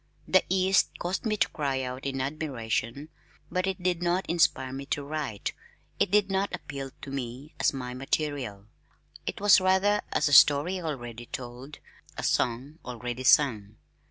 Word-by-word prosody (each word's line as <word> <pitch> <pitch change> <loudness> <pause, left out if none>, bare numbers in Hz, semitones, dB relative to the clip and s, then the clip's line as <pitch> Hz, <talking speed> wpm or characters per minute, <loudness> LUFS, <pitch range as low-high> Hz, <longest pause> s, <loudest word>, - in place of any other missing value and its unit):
The 185 - +4
East 190 0 +2
caused 185 +6 -2
me 215 -1 0
to - - +3
cry 135 -3 -2
out 130 +2 -5
in 135 -1 -2
admiration, 135 -2 -3 0.4
but 185 +1 0
it 190 -1 -3
did 175 -1 0
not 175 +2 +1
inspire 140 -6 +2
me 135 +1 -6
to 145 - -2
write. 140 -8 -4 0.5
It - - +3
did 200 0 +3
not 195 0 0
appeal 140 -5 -7
to 135 - -7
me 135 +2 -6
as - - +3
my 125 -2 -5
material. 135 -6 -2 0.6
It - - -3
was 205 -1 +6
rather 190 +2 +3
as - - +2
a 145 - 0
story 150 +7 +6
already 120 -7 -5
told, 125 +4 -8 0.4
a - - -4
song 130 +7 0
already 125 +1 -5
sung. 110 -7 +3
140 Hz, 160 wpm, -28 LUFS, 125-180 Hz, 0.6 s, was